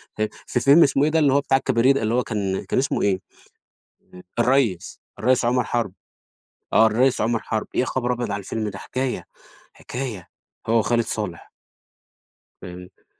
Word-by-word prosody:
في 110 0 -1 0.2
في 125 - 0
فيلم 140 +7 +6
اسمه 140 0 +2
إيه 150 - +3
ده 160 - +3
اللي 145 -4 +3
هو 140 - +4
بتاع 135 -1 +2
الكباريه 130 -1 +2
ده، 135 - -1
اللي 110 +1 0
هو 125 - +2
كان 100 -4 -3
كان - - 0
اسمه 135 - 0
إيه؟ 95 -2 +1 1.2
الريّس، 120 -7 +1 0.2
الريّس 125 +2 +2
عُمَر 125 +1 +2
حَرب، 115 -6 -2 0.8
آه 110 +1 +6
الريّس 125 +3 +2
عُمَر 115 +1 +1
حَرب، 110 -1 -3
يا 130 - +2
خبر 125 -1 -1
أبيض 120 -4 -3
على 100 - -2
الفيلم 105 +2 -4
ده! 95 - -8
حكاية، 130 +4 -3 0.5
حكاية 120 -8 -6 0.4
هو 115 +1 +3
وخالد 115 +1 +1
صالح. 105 -6 -5 1.1
فهمت. 90 0 -11
120 Hz, 170 wpm, -23 LUFS, 105-130 Hz, 1.2 s, فيلم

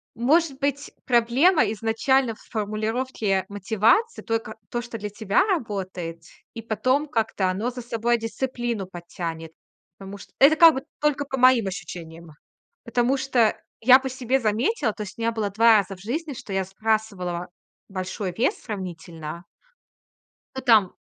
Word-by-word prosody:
может 280 +4 +2
быть, 285 0 -2
проблема 255 +9 +4
изначально 225 +2 +1
в - - -23
формулировке 215 -1 -1
мотивации, 220 - +1
только 225 -1 -3
то, 240 - -2
что 235 -1 -7
для 210 -1 -5
тебя 210 - +1
работает, 190 - -3 0.3
и 230 - -6
потом 255 +7 0
как-то 220 -7 0
оно 205 +6 -1
за 250 0 -7
собой 235 0 0
и - - -11
дисциплину 240 -2 -3
подтянет. 170 -2 -7 0.5
Потому 195 +1 -9
что - - -15
это 300 +4 +6
как 330 0 +9
бы 265 - -3 0.2
только 295 -1 +1
по 270 -1 -4
моим 255 -5 +5
ощущениям. 170 -3 -8 0.5
Потому 240 +3 +1
что 245 -5 +2 0.2
я 250 +3 +8
по 265 0 -4
себе 260 +1 0
заметила, 225 - +1
то 210 - -6
есть 200 - -10
у - - -8
меня 230 0 +1
было 215 -3 -2
2 225 +2 +6
раза 195 -1 -2
в 185 - -17
жизни, 285 - -3
что 245 -4 -9
я 190 -1 0
сбрасывала 195 -4 -2 0.4
большой 185 +1 -4
вес 250 - +2
сравнительно 170 -4 -7 1.1
Ну, - - -3
там 215 -6 +5
225 Hz, 155 wpm, -24 LUFS, 195-255 Hz, 1.1 s, как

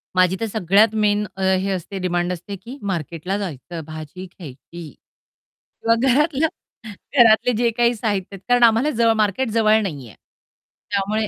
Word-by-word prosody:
माझी 185 0 +3
तर - - 0
सगळ्यात 210 +2 +3
मेन 210 -1 +1
हे 190 +1 +1
असते 190 +1 -5
डिमांड 175 -1 -1
असते, 180 +3 -7
की 235 +8 -11
मार्केटला 180 -1 -3
जायचं, 170 -3 -6
भाजी 155 +3 -9
घ्यायची. 170 -1 -11 0.9
किंवा 230 0 +3
घरातल्या 295 +4 +2 0.7
घरातले 235 0 +5
जे 235 0 +2
काही 240 0 +3
साहित्य 205 -4 -2
आहेत 190 - -13
कारण 245 0 +4
आम्हाला 230 +5 +4
जवळ 230 -2 +2
मार्केट 215 +3 0
जवळ 220 -1 +3
नाहीये. 140 - -6 0.8
त्यामुळे 205 +2 0
200 Hz, 145 wpm, -21 LUFS, 180-225 Hz, 0.9 s, घरातले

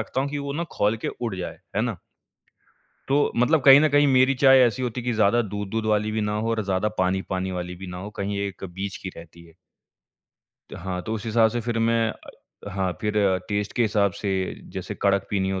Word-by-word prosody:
रखता 120 +4 -2
हूँ 140 - -1
कि 145 - -3
वो 140 0 -4
ना 165 +4 -2
खौल 105 +2 +1
के - - +1
उड़ 115 -5 -2
जाए, 85 -2 -6 0.2
है 105 - +2
ना? 115 -4 -2 1.1
तो 145 +2 +3
मतलब 140 +6 +3
कहीं 135 +1 +9
न 155 - +4
कहीं 145 0 +4
मेरी 130 0 +4
चाय 135 -1 +8
ऐसी 115 +2 -2
होती 125 0 -3
कि 125 0 -1
ज़्यादा 110 +2 +3
दूध-दूध 105 +2 -4
वाली 105 0 +1
भी 110 - -1
ना 105 0 -1
हो 115 +2 -1
और 115 -1 0
ज़्यादा 95 +2 0
पानी-पानी 95 0 -1
वाली 90 0 -4
भी 95 +1 -9
ना 90 - -7
हो, 100 +3 -7
कहीं 100 -1 -3
एक 100 -1 -5
बीच 95 +2 -5
की 95 - -7
रहती 85 0 -13
है। 80 -1 -19 1.2
त - - -6
हाँ, 90 +1 -4
तो 110 - -5
उस 110 0 -5
हिसाब 110 0 +4
से 120 +1 -2
फ़िर 115 0 -2
मैं 115 0 +2
अ, 100 - -13
हाँ 95 -1 -1
फ़िर 105 -2 -1 0.3
टेस्ट 105 0 -2
के 120 - +3
हिसाब 105 -3 +2
से 100 0 -5 0.4
जैसे - - -5
कड़क 100 -1 +2
पीनी 95 -2 0
हो 95 -1 -2
105 Hz, 225 wpm, -24 LUFS, 95-120 Hz, 1.2 s, कहीं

